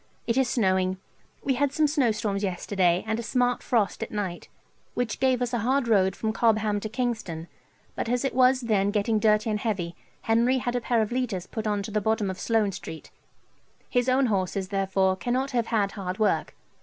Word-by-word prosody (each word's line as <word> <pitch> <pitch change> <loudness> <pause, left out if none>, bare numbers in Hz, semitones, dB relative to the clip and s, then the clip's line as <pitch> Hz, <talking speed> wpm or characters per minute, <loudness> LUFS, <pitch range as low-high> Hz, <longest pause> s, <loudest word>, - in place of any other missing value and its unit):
It 230 - 0
is 265 -2 +2
snowing. 190 -5 +1 0.5
We 270 - +1
had 275 +2 +1
some 310 +2 +2
snowstorms 225 -9 0
yesterday, 185 -2 +1
and 220 +1 -1
a - - -2
smart 245 +2 0
frost 225 -6 0
at - - -3
night, 190 -5 -4 0.5
which 245 -3 -2
gave 255 -2 +2
us 245 - -3
a 240 - +1
hard 260 +3 +1
road 190 -4 +3
from 220 -1 -2
Cobham 215 -2 +2
to 215 - -5
Kingston; 220 -9 -3 0.5
but - - -3
as 245 +2 0
it 270 - -1
was 255 +1 +4
then 205 -4 +1
getting 215 +1 +1
dirty 215 +1 +3
and 210 - -1
heavy, 185 -7 -2 0.3
Henry 235 +3 +3
had 245 -1 -2
a 245 - 0
pair 230 -1 +2
of 215 - -5
leaders 235 -8 -2
put 220 +2 -4
on 205 -1 0
to 210 - -6
the 210 0 0
bottom 220 -2 0
of 185 - -8
Sloane 220 -3 +1
St. 160 -3 -9 0.8
His 245 0 +2
own 260 +1 +3
horses, 190 -3 -1
therefore, 190 -1 +1
cannot 255 +6 -1
have 235 -3 0
had 205 -4 +1
hard 185 -2 -5
work. 215 -1 0
220 Hz, 200 wpm, -26 LUFS, 195-245 Hz, 0.8 s, was